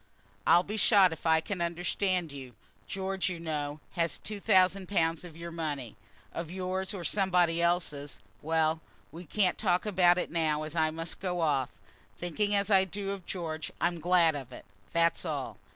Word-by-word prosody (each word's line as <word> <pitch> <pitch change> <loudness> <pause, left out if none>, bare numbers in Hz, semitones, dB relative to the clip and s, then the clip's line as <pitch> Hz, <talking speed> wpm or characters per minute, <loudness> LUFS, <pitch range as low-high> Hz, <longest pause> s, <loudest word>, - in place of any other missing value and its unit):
"I'll 175 - +6
be 210 +3 -5
shot 195 -4 +5
if 160 - -6
I 160 0 +4
can 185 +1 -4
understand 175 0 -1
you. 130 -3 -9 0.3
George, 190 -1 -2
you 175 -2 -5
know, 150 -2 -3
has 165 -4 0
had - - -13
two 210 -1 -4
thousand 190 -2 +3
pounds 165 -4 +1
of 165 -3 -11
your 170 0 -7
money, 145 -8 -4 0.4
of 170 -1 -5
yours 185 +1 -2
or 195 -4 -6
somebody 180 -4 +2
else's. 165 -5 0 0.2
Well, 160 0 +1 0.3
we 170 +3 -9
can't 185 +2 +1
talk 180 -3 +1
about 180 -3 +4
it - - -2
now, 155 -2 0
as 155 +1 -6
I 160 -1 +3
must 165 +1 -4
be 190 - -4
off. 155 -7 +1 0.5
Thinking 205 +4 0
as 200 +1 0
I 190 -1 +6
do 195 +1 -4
of 195 -3 -7
George, 160 -4 -4
I'm 170 0 0
glad 170 -1 +4
of 135 -3 -7
it, - - -11 0.3
that's 170 0 +2
all." 150 -6 -4
170 Hz, 185 wpm, -30 LUFS, 160-190 Hz, 0.5 s, I'll